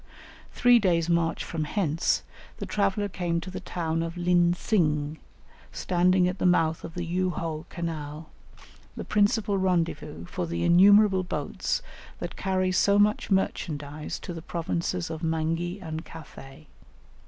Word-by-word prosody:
Three 245 Hz, -1 st, +5 dB
days' 170 Hz, -5 st, +1 dB
march 165 Hz, -1 st, +1 dB
from 160 Hz, -2 st, -3 dB
hence, 165 Hz, -1 st, 0 dB, 0.3 s
the -, -, -5 dB
traveller 205 Hz, 0 st, 0 dB
came 175 Hz, -3 st, -2 dB
to 185 Hz, -, -7 dB
the -, -, -5 dB
town 165 Hz, -2 st, -2 dB
of 165 Hz, +1 st, -4 dB
Lin 175 Hz, 0 st, +3 dB
tsing, 155 Hz, -7 st, 0 dB, 0.5 s
standing 180 Hz, 0 st, +2 dB
at 180 Hz, +1 st, -3 dB
the -, -, 0 dB
mouth 165 Hz, -2 st, +2 dB
of 165 Hz, -, -8 dB
the 175 Hz, -1 st, -3 dB
Yu 185 Hz, +2 st, 0 dB
ho 160 Hz, -2 st, -4 dB
canal, 155 Hz, -2 st, -5 dB, 0.7 s
the -, -, -5 dB
principal 205 Hz, -1 st, +2 dB
rendezvous 165 Hz, -, -1 dB
for 85 Hz, 0 st, -4 dB
the 85 Hz, +1 st, -2 dB
innumerable 195 Hz, +2 st, +6 dB
boats -, -, -2 dB, 0.3 s
that -, -, -6 dB
carry 185 Hz, -1 st, 0 dB
so 200 Hz, +2 st, +3 dB
much 210 Hz, +1 st, +2 dB
merchandise 150 Hz, -6 st, -2 dB
to 175 Hz, -, -6 dB
the 165 Hz, -, -7 dB
provinces 170 Hz, +1 st, -3 dB
of 160 Hz, 0 st, -5 dB
Mangi 165 Hz, +3 st, -1 dB
and 160 Hz, -3 st, -5 dB
Cathay. 155 Hz, -2 st, -12 dB
170 Hz, 145 wpm, -27 LUFS, 160-185 Hz, 0.7 s, innumerable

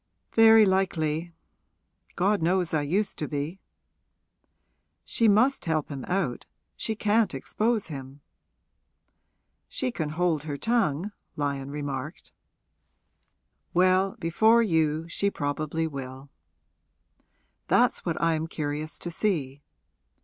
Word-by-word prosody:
'Very 225 Hz, -1 st, +7 dB
likely. 170 Hz, -4 st, 0 dB, 0.8 s
God 200 Hz, +2 st, +2 dB
knows 175 Hz, +1 st, +1 dB
I 155 Hz, -, +2 dB
used 195 Hz, +8 st, -1 dB
to 150 Hz, -, -2 dB
be!' 150 Hz, +5 st, -4 dB, 1.5 s
'She 230 Hz, -, +2 dB
must 225 Hz, +6 st, +3 dB
help 160 Hz, -3 st, -1 dB
him 140 Hz, -3 st, -6 dB
out 180 Hz, -10 st, -2 dB, 0.3 s
she 220 Hz, -, -2 dB
can't 215 Hz, +1 st, +2 dB
expose 220 Hz, -3 st, -1 dB
him.' 135 Hz, -1 st, -8 dB, 1.5 s
'She 255 Hz, -1 st, -2 dB
can 160 Hz, -9 st, -3 dB
hold 160 Hz, -1 st, 0 dB
her 145 Hz, -1 st, -5 dB
tongue,' 210 Hz, -4 st, 0 dB, 0.2 s
Lyon 140 Hz, -2 st, -2 dB
remarked. 145 Hz, +1 st, -5 dB, 1.4 s
'Well, 185 Hz, +2 st, +3 dB
before 220 Hz, +7 st, +4 dB
you 160 Hz, -4 st, +1 dB, 0.3 s
probably 150 Hz, +2 st, -2 dB
she -, -, 0 dB
will.' 135 Hz, -1 st, -8 dB, 1.4 s
'That's -, -, +3 dB
what -, -, -2 dB
I 165 Hz, +1 st, +2 dB
am 160 Hz, 0 st, -2 dB
curious 155 Hz, -1 st, -4 dB
to 175 Hz, -, -6 dB
see.' 150 Hz, -8 st, -1 dB
165 Hz, 110 wpm, -27 LUFS, 145-195 Hz, 1.5 s, Very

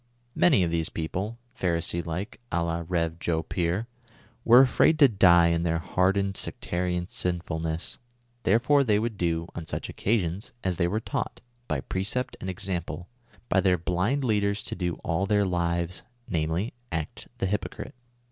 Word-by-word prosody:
Many 140 Hz, -, +4 dB
of 85 Hz, -, 0 dB
these 80 Hz, -1 st, 0 dB
people, 95 Hz, +8 st, -3 dB, 0.2 s
y)harisee 85 Hz, -1 st, 0 dB
like— 90 Hz, +6 st, -5 dB
<J 80 Hz, -, 0 dB
la 85 Hz, 0 st, -1 dB
Rev. 85 Hz, -2 st, -1 dB
Joe 80 Hz, -2 st, 0 dB
Pier 90 Hz, +6 st, -1 dB, 0.3 s
— -, -, -30 dB
were 120 Hz, +2 st, +8 dB
af 130 Hz, -, 0 dB
rnid 160 Hz, -, +6 dB
to 145 Hz, -3 st, +8 dB
die 90 Hz, -6 st, +6 dB
in 85 Hz, 0 st, +1 dB
their 85 Hz, -1 st, +1 dB
hardened 95 Hz, +3 st, +1 dB
sectarian 90 Hz, 0 st, -2 dB
sinfulness; 80 Hz, -3 st, -3 dB, 0.4 s
there 105 Hz, 0 st, +4 dB
fore 140 Hz, +4 st, +4 dB
tliey 105 Hz, -6 st, +3 dB
would 115 Hz, 0 st, -2 dB
do, 85 Hz, -3 st, 0 dB
on 80 Hz, -2 st, -6 dB
such -, -, -4 dB
occasions, 100 Hz, -2 st, -1 dB
as 90 Hz, -3 st, -1 dB
they 85 Hz, -, +2 dB
were 105 Hz, +5 st, 0 dB
taught, 135 Hz, +4 st, -3 dB, 0.3 s
by 75 Hz, -4 st, -1 dB
precept 120 Hz, -, -2 dB
and 95 Hz, -, -4 dB
example, 90 Hz, -2 st, -4 dB, 0.4 s
by 95 Hz, -, +3 dB
their 95 Hz, -2 st, +3 dB
blind 90 Hz, -, 0 dB
leaders 105 Hz, -3 st, +1 dB
to -, -, -4 dB
do 90 Hz, -2 st, -2 dB
all 90 Hz, +3 st, 0 dB
their 105 Hz, -1 st, +3 dB
lives, 85 Hz, -1 st, -1 dB, 0.3 s
namely: 80 Hz, +6 st, -1 dB, 0.2 s
act 80 Hz, -2 st, -4 dB
the -, -, -1 dB
hypocrite. 105 Hz, +7 st, -3 dB
90 Hz, 165 wpm, -27 LUFS, 85-105 Hz, 0.4 s, were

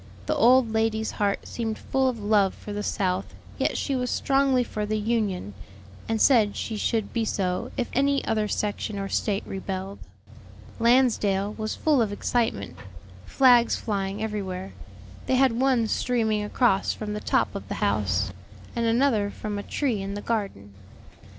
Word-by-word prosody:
The -, -, 0 dB
old 245 Hz, -1 st, +5 dB
lady's 220 Hz, 0 st, 0 dB
heart 200 Hz, -1 st, -1 dB
seemed 225 Hz, -2 st, -3 dB
full 265 Hz, 0 st, 0 dB
of 250 Hz, -, -4 dB
love 205 Hz, -2 st, +3 dB
for 210 Hz, -, -8 dB
the 205 Hz, -, -3 dB
South, 185 Hz, -2 st, -2 dB, 0.2 s
yet -, -, 0 dB
she 275 Hz, -, -1 dB
was 250 Hz, -1 st, -1 dB
strongly 270 Hz, -1 st, +2 dB
for 215 Hz, -3 st, -4 dB
the 215 Hz, +1 st, -1 dB
Union, 210 Hz, -, -1 dB, 0.6 s
and 225 Hz, -1 st, 0 dB
said 220 Hz, -6 st, +4 dB
she 225 Hz, -, -4 dB
should 220 Hz, 0 st, -1 dB
be 230 Hz, -, 0 dB
so 185 Hz, -4 st, -1 dB
if 245 Hz, -, 0 dB
any 275 Hz, +1 st, +2 dB
other 215 Hz, -1 st, 0 dB
section 210 Hz, 0 st, -2 dB
or 195 Hz, 0 st, -3 dB
State 205 Hz, -2 st, -1 dB
rebelled. 190 Hz, 0 st, -5 dB, 0.8 s
Lansdale 220 Hz, -5 st, +3 dB
was 215 Hz, 0 st, -4 dB
full 300 Hz, -5 st, +2 dB
of 215 Hz, -3 st, 0 dB
excitement, 215 Hz, -, -1 dB, 0.5 s
flags 245 Hz, -3 st, +5 dB
flying 200 Hz, -1 st, -3 dB
everywhere; 195 Hz, -3 st, -4 dB, 0.5 s
they 260 Hz, -, +2 dB
had 265 Hz, 0 st, +4 dB
one 255 Hz, -4 st, +3 dB
streaming 220 Hz, -2 st, 0 dB
across 210 Hz, -2 st, +2 dB
from 210 Hz, -1 st, -5 dB
the 210 Hz, -, -3 dB
top -, -, 0 dB
of -, -, -7 dB
the -, -, -4 dB
house, 100 Hz, -1 st, 0 dB, 0.4 s
and 235 Hz, -1 st, 0 dB
another 225 Hz, -3 st, +2 dB
from 205 Hz, 0 st, -5 dB
a -, -, -3 dB
tree 235 Hz, -1 st, -1 dB
in 195 Hz, +1 st, -4 dB
the 205 Hz, -, -5 dB
garden. 195 Hz, -, -3 dB
215 Hz, 165 wpm, -25 LUFS, 200-240 Hz, 0.8 s, old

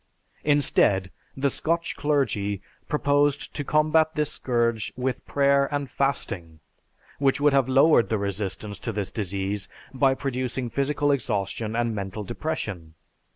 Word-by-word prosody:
Instead, 105 Hz, -10 st, +3 dB, 0.3 s
the 140 Hz, 0 st, +1 dB
Scotch 165 Hz, +1 st, -1 dB
clergy 110 Hz, -10 st, 0 dB, 0.3 s
proposed 145 Hz, -1 st, +1 dB
to 145 Hz, -, -3 dB
combat 155 Hz, +2 st, +3 dB
this 150 Hz, -1 st, 0 dB
scourge 115 Hz, -4 st, 0 dB
with 125 Hz, -1 st, -2 dB
prayer 140 Hz, 0 st, +3 dB
and 145 Hz, -3 st, -2 dB
fasting, 90 Hz, -, -2 dB, 0.6 s
which 135 Hz, 0 st, +2 dB
would 145 Hz, 0 st, +4 dB
have 135 Hz, -2 st, +3 dB
lowered 135 Hz, -1 st, +5 dB
the 110 Hz, -, +1 dB
resistance 100 Hz, +1 st, -4 dB
to 115 Hz, -, -3 dB
this 100 Hz, -3 st, -3 dB
disease 100 Hz, -1 st, -3 dB, 0.2 s
by 135 Hz, 0 st, +3 dB
producing 130 Hz, -2 st, -3 dB
physical 145 Hz, +1 st, +1 dB
exhaustion 110 Hz, -3 st, -1 dB
and 120 Hz, -1 st, 0 dB
mental 100 Hz, +1 st, -4 dB
depression. 105 Hz, -, -4 dB
130 Hz, 130 wpm, -25 LUFS, 105-145 Hz, 0.6 s, lowered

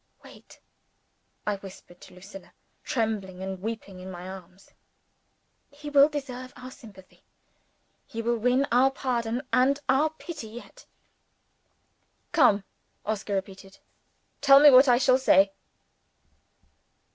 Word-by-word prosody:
"Wait!" -, -, -17 dB, 0.9 s
I 210 Hz, -1 st, -1 dB
whispered 190 Hz, -2 st, -14 dB
to -, -, -15 dB
Lucilla, 195 Hz, +1 st, -13 dB, 0.3 s
trembling 205 Hz, -6 st, -3 dB
and 190 Hz, -1 st, -6 dB
weeping 210 Hz, -3 st, -6 dB
in 185 Hz, +1 st, -9 dB
my 180 Hz, 0 st, -9 dB
arms. 190 Hz, 0 st, -12 dB, 1.0 s
"He 295 Hz, +1 st, -10 dB
will 285 Hz, +1 st, +6 dB
deserve 255 Hz, -4 st, -7 dB
our 255 Hz, +1 st, -10 dB
sympathy; 200 Hz, -8 st, -16 dB, 0.8 s
he 230 Hz, -, -8 dB
will 235 Hz, +1 st, 0 dB
win 250 Hz, +4 st, +2 dB
our 250 Hz, +3 st, +4 dB
pardon 245 Hz, -2 st, -3 dB
and 265 Hz, +3 st, +3 dB
our 275 Hz, +4 st, +2 dB
pity 315 Hz, -5 st, -9 dB
yet!" 230 Hz, +3 st, -13 dB, 1.4 s
"Come!" 215 Hz, -10 st, +3 dB, 0.4 s
Oscar 210 Hz, -1 st, -3 dB
repeated. 195 Hz, 0 st, -7 dB, 0.6 s
"Tell 275 Hz, -1 st, +7 dB
me 290 Hz, 0 st, +8 dB
what 260 Hz, +2 st, +7 dB
I 245 Hz, -1 st, +5 dB
shall 255 Hz, 0 st, +3 dB
say." 195 Hz, -6 st, +4 dB
230 Hz, 120 wpm, -26 LUFS, 195-265 Hz, 1.4 s, me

